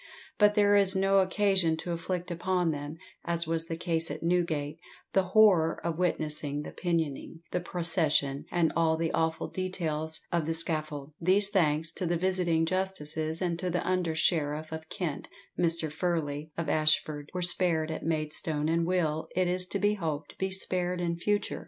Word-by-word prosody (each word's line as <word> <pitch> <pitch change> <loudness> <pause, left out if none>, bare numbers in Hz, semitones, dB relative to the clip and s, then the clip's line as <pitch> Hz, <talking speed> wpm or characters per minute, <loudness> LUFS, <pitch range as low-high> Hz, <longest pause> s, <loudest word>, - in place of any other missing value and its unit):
But 210 0 +5
there 205 -1 +4
is 195 -1 +5
no 195 +1 +3
occasion 190 -3 +2
to 175 - -5
inflict 175 +1 -3
upon 180 0 0
them, 145 +1 -6 0.3
as 170 0 -1
was 165 0 -2
the 165 - -4
case 165 -1 -1
at - - -6
Newgate, 165 -3 0 0.3
the 190 -1 +3
horror 190 -7 +5
of 170 0 -2
witnessing 150 -4 -1
the - - -8
pinioning, 165 -2 -3
the 180 - 0
procession, 160 -5 0
and 170 -2 +1
all 160 -1 +2
the 165 0 -1
awful 160 0 -1
details 160 -4 -3
of 170 -3 0
the 165 - +1
scaffold. 155 -3 0
These, 195 +4 +4
thanks 160 -4 +1
to 180 - -4
the 170 0 +1
visiting 175 -2 +1
justices 160 -3 -2
and 170 -2 -1
to 180 0 -2
the 175 0 -2
under 180 -3 0
sheriff 155 -1 0
of 160 0 -7
Kent, 175 -8 -4 0.3
Mr. 165 -2 0
Furley, 155 -3 -2
of 165 -2 -2
Ashford, 155 -1 +1
were 180 - -1
spared 170 -3 +3
at 160 - -4
Maidstone, 155 -1 0
and 165 0 +1
will, 160 -4 0
it 185 0 +2
is 180 +1 -1
to 200 - -2
be 205 +1 +2
hoped, 160 -7 -4
be 190 - 0
spared 180 -1 0
in 170 -1 -1
future. 205 +3 -1
165 Hz, 175 wpm, -29 LUFS, 155-180 Hz, 0.3 s, But